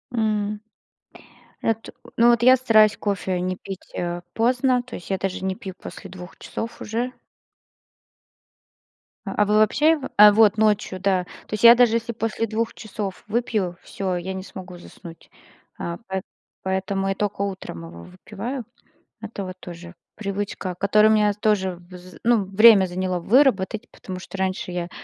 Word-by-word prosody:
М. 210 -2 0 1.0
Эт 225 0 -1 0.3
ну 235 +1 +6
вот 235 -1 +3
я 255 +1 +8
стараюсь 215 -5 +4
кофе 190 -3 -2
не 185 0 -2
пить, 195 -1 -9
э, 175 0 -3
поздно, 250 +2 +2
то 245 - -9
есть 175 - -10
я 190 - 0
даже 190 0 -3
не 190 0 -1
пью 195 -4 -8
после 195 - -9
2 180 0 -11
часов 230 +1 -6
уже. 235 +4 -2 2.1
А 210 - +1
вы 210 +1 +1
вообще 245 +9 +4
его? 295 -5 -1
А, 210 0 +10
вот 215 0 +4
ночью, 210 -3 +1
да. 185 -1 +1 0.2
То - - -10
есть 215 - -3
я 235 0 +10
даже, 240 -2 +4
если 230 0 -2
после 225 0 -2
2 225 +2 -2
часов 205 -3 -6
выпью, 210 -5 -1
всё, 190 -2 -3
я 180 +2 -4
не 190 0 -6
смогу 185 -1 -10
заснуть. 170 -1 -13 0.5
А, 170 0 -4
поэт 190 0 -3 0.4
поэтому 190 +1 -1
я 195 - 0
только 205 0 -2
утром 185 - -6
его 85 0 -11
выпиваю. 220 - -7 0.6
Это 210 -2 -6
вот 185 0 -7
тоже 175 0 -10 0.2
привычка, 200 -2 -4
которая 210 +3 +4
у - - +5
меня 210 -1 +3
тоже 200 -3 0 0.2
вз 180 0 -12
ну, 230 -4 +3
время 195 0 +7
заняло 185 0 -2
выработать, 220 0 +2
потому 185 -1 -8
что 190 - -9
раньше 190 -1 -2
я 175 -1 -4
200 Hz, 165 wpm, -23 LUFS, 185-225 Hz, 2.1 s, А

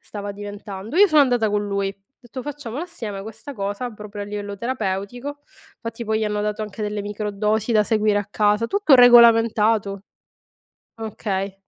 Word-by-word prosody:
stava 205 -1 -7
diventando. 205 - -7
Io 410 +2 +8
sono 310 -5 +5
andata 245 -5 +3
con 205 0 0
lui, 200 -1 -1
ho - - -14 0.3
detto: 255 +1 -8
"Facciamola 290 -1 -6
assieme 225 - -6
questa 220 +7 -9
cosa, 205 +3 -3
proprio 210 -1 -8
a - - -4
livello 205 0 -6
terapeutico." 240 +5 -4 0.4
Fatti, 230 0 -6
poi, 220 0 0
gli 220 - 0
hanno 210 0 -1
dato 210 +1 -2
anche 215 +1 -6
delle 210 0 -2
microdosi 210 +2 -2
da 215 -2 +4
seguire 215 -1 +2
a 205 - -3
casa, 210 +2 +2
tutto 400 - +4
regolamentato. 225 -4 +5 1.0
Okay, 200 -3 -3
215 Hz, 165 wpm, -22 LUFS, 205-235 Hz, 1.0 s, Io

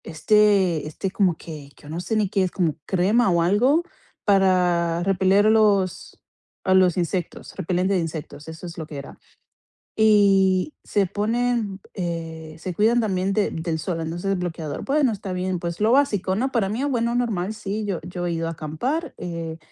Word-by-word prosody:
Este 185 -1 +2
este, 185 +5 -4
como 185 -4 +2
que, 150 -4 -10
que - - -21
yo 145 - -12
no 160 +2 -4
sé 220 - -2
ni 215 -2 +2
qué 195 +1 0
es, 185 - 0
como 170 -6 0
crema 200 +5 +2
o 170 -2 +2
algo, 250 - +3 0.4
para 180 -4 +2
repeler 195 +2 +3
a - - +5
los 205 -4 +2 0.5
a 190 - +2
los 185 -2 +4
insectos, 180 0 -3
repelente 180 +3 0
de 190 - +2
insectos, 160 -2 -6
eso 160 +2 -9
es 170 - -9
lo 160 - -5
que 150 - -8
era. 140 - -9 0.8
Y 200 +1 +4
se 200 -1 +1
ponen, 220 0 -1
eh, 165 -3 -5
se 180 +3 -5
cuidan 225 +6 +3
también 195 -2 0
de 205 0 +1
del 160 0 -3
sol, 170 0 -3
entonces, 170 +4 -3
el 195 - 0
bloqueador. 165 -4 -4
Bueno, 275 -2 +2
está 200 -3 -5
bien. 180 0 -2
Pues 170 +2 -5
lo 220 +2 +3
básico, 215 -9 +2
¿no? 260 +6 -1
Para 215 -6 +1
mí, 225 +6 -2
bueno, 235 -4 0
normal, 215 -5 -1
sí, 210 0 -4
yo 195 -4 -2
yo 175 0 -5
he 175 - -1
ido 165 0 -2
a - - -2
acampar, 165 - -3
eh, 165 -2 -5
185 Hz, 190 wpm, -23 LUFS, 170-210 Hz, 0.8 s, a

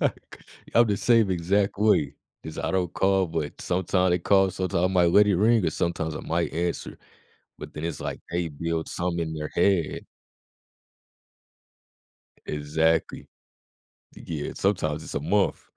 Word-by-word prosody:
Like, - - -3 0.4
I'm 120 0 +6
the 105 -2 0
same 115 -3 +3
exact 95 +3 0
way, 75 -10 +2 0.3
'cause 80 - -8
I - - -2
don't 90 -2 -1
call, 95 -1 +2
but 80 -3 -4
sometime 90 0 +1
they 90 - +2
call, 95 +2 +3
sometime 90 -1 -1
I - - +5
might 90 -2 +3
let 105 +3 +6
it 100 - +2
ring, 110 +1 +3
or - - +1
sometimes 80 -1 -2
I - - -5
might 85 +1 -2
answer, 85 +1 -3 0.6
but - - -9
then 75 - -7
it's 85 - -4
like - - -5
they 85 0 -1
build 80 +2 -3
something 85 0 -2
in - - -5
their 75 -1 -5
head 90 -2 +1 2.4
Exactly. 80 +2 0 0.9
Yeah, 75 -3 -5
sometimes 80 -6 -1
it's - - -8
a - - -1
month. 95 +6 +1
85 Hz, 155 wpm, -25 LUFS, 80-95 Hz, 2.4 s, I'm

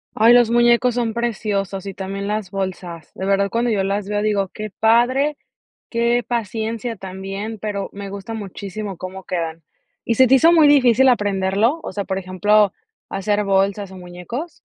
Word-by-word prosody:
Ay, 230 +2 +6
los 240 -2 +5
muñecos 240 +1 +3
son 230 -2 -1
preciosos 200 -5 -2
y 195 - -5
también 195 +1 -5
las 210 -3 -2
bolsas. 180 -4 -5
De 190 - -5
verdad 200 0 +2
cuando 235 +2 0
yo 200 -3 +1
las 200 +1 -2
veo 205 0 0
digo: 205 -2 0
"Qué 215 -1 -7
padre, 255 +8 +2 0.5
qué 235 +1 +1
paciencia 230 0 -3
también", 195 +3 -6
pero 205 -1 -4
me 200 0 -7
gusta 200 +3 -7
muchísimo 200 -1 -6
cómo 185 +1 -8
quedan. 165 -2 -4 0.4
¿Y 230 - +1
se 260 +1 +6
te 265 - +6
hizo 325 +5 +6
muy 320 -3 +6
difícil 265 -3 +5
aprenderlo? 205 +5 +1
O - - -6
sea, 200 -1 -3
por 190 -1 -2
ejemplo, 195 +2 +2 0.4
¿hacer 205 +2 -1
bolsas, 195 0 0
o, 190 - -10
muñecos? 180 - -7
205 Hz, 170 wpm, -20 LUFS, 195-235 Hz, 0.5 s, Ay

